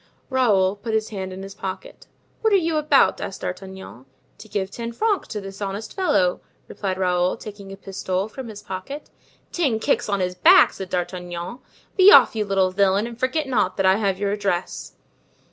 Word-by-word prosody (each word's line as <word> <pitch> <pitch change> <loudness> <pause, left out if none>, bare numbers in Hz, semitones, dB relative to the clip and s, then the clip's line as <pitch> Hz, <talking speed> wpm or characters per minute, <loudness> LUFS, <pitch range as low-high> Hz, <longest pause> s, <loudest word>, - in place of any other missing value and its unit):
Raoul 205 -7 +2
put 220 +2 -3
his 220 0 -1
hand 190 -3 -5
in 190 +1 -7
his 195 0 -8
pocket. 190 -1 -7 0.3
"What 440 - +2
are - - +7
you 330 -4 +1
about?" 300 -2 +3
asked 195 - -6
D'Artagnan. 190 -8 -7 0.3
"To 215 - -12
give 195 -1 -2
ten 235 +2 -5
francs 420 - 0
to 210 - -5
this 195 0 -9
honest 200 +2 -4
fellow," 185 - +1 0.3
replied 190 -2 -4
Raoul, 180 0 +1
taking 205 -3 -10
a 195 - -8
pistole 190 0 -3
from 255 +3 -8
his 210 -2 -9
pocket. 195 +11 -7 0.4
"Ten 280 -10 +1
kicks 220 - 0
on 200 -1 0
his 180 -1 -1
back!" 180 - +6
said 190 -1 -7
D'Artagnan; 180 +4 -4 0.4
"be 380 +1 +8
off, 435 - +7
you 215 -1 0
little 195 -2 +1
villain, 200 +2 +2
and 235 0 -8
forget 280 +4 0
not 210 -8 0
that 195 - +1
I 190 +1 +5
have 200 -3 0
your 200 0 -1
address." 200 -3 -3
200 Hz, 190 wpm, -23 LUFS, 190-230 Hz, 0.4 s, be